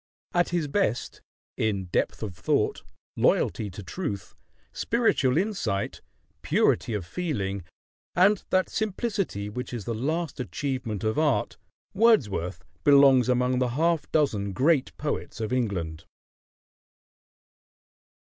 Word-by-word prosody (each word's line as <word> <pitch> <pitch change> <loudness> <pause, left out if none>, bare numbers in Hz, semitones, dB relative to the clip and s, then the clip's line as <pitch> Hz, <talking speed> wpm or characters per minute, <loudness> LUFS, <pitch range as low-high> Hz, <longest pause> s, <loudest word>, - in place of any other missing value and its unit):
At 175 0 +2
his 170 -3 0
best, 140 - -1 0.4
in 100 -4 0
depth 90 - -1
of 100 -4 -4
thought, 85 - 0 0.3
loyalty 105 - +2
to 100 +2 -9
truth, 100 - -5 0.4
spiritual 225 - +2
insight, 185 - -1 0.4
purity 115 - +2
of 100 -4 -3
feeling, 100 - -3 0.5
and 190 +3 +4
that 185 0 +2
simplicity 200 - -2
which 125 +4 -5
is 120 -5 -5
the 120 - -2
last 150 +6 -2
achievement 125 -4 -3
of 110 +6 0
art, 150 -4 +1 0.4
Wordsworth 105 - +2 0.2
belongs 140 -4 +6
among 125 0 +2
the 125 -1 +1
half 165 -1 +1
dozen 105 -11 +1
great 140 - +2
poets 145 -5 -4
of 110 +2 -2
England. 85 -10 -2
125 Hz, 115 wpm, -26 LUFS, 105-165 Hz, 0.5 s, belongs